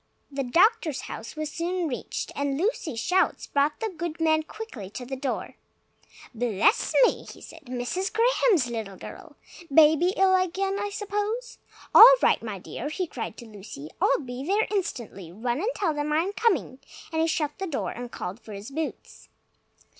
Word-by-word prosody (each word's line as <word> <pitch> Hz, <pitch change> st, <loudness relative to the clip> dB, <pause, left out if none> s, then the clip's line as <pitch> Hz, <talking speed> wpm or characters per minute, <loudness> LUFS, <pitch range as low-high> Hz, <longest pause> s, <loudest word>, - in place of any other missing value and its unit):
The 275 Hz, 0 st, -2 dB
doctor's 340 Hz, -, +3 dB
house 225 Hz, -, -8 dB
was 310 Hz, -1 st, -4 dB
soon 345 Hz, +1 st, -2 dB
reached, 255 Hz, -, -4 dB
and 280 Hz, -1 st, -1 dB
Lucy's 325 Hz, -, -1 dB
shouts 365 Hz, +10 st, +1 dB
brought 285 Hz, +1 st, +1 dB
the 445 Hz, -, -1 dB
good 330 Hz, 0 st, -4 dB
man 315 Hz, -1 st, +3 dB
quickly 315 Hz, -, -8 dB
to 245 Hz, +5 st, -7 dB
the 265 Hz, +2 st, -4 dB
door. 265 Hz, -1 st, -4 dB, 0.8 s
"Bless 230 Hz, -, +2 dB
me!" -, -, -1 dB
he -, -, -13 dB
said, 325 Hz, -2 st, -13 dB
"Mrs. 255 Hz, +10 st, -2 dB
Graham's 455 Hz, -, +3 dB
little 220 Hz, -5 st, -5 dB
girl! -, -, -11 dB, 0.4 s
Baby 315 Hz, +5 st, +5 dB
ill 380 Hz, 0 st, +5 dB
again, 385 Hz, +2 st, 0 dB
I 410 Hz, 0 st, -2 dB
suppose? 415 Hz, +4 st, -3 dB, 0.3 s
All -, -, +11 dB
right, -, -, +4 dB
my -, -, -5 dB
dear!" 290 Hz, -, -6 dB
he 365 Hz, +4 st, -2 dB
cried 320 Hz, -, -6 dB
to 240 Hz, -, -10 dB
Lucy. 195 Hz, -9 st, -10 dB
"I'll 275 Hz, -, +4 dB
be 250 Hz, -1 st, -6 dB
there 405 Hz, +8 st, +2 dB
instantly. 235 Hz, -, -3 dB
Run 240 Hz, +7 st, -2 dB
and 415 Hz, +8 st, 0 dB
tell 345 Hz, -6 st, 0 dB
them 295 Hz, 0 st, -2 dB
I'm 335 Hz, +6 st, +1 dB
coming!" 395 Hz, -, 0 dB, 0.3 s
and 320 Hz, 0 st, 0 dB
he 325 Hz, -, +2 dB
shut 305 Hz, -1 st, -1 dB
the 385 Hz, -, -2 dB
door 295 Hz, -5 st, -2 dB
and 245 Hz, 0 st, -7 dB
called 180 Hz, +5 st, -6 dB
for 220 Hz, -2 st, -11 dB
his 200 Hz, +6 st, -8 dB
boots. 310 Hz, +2 st, -6 dB
310 Hz, 175 wpm, -26 LUFS, 245-385 Hz, 0.8 s, All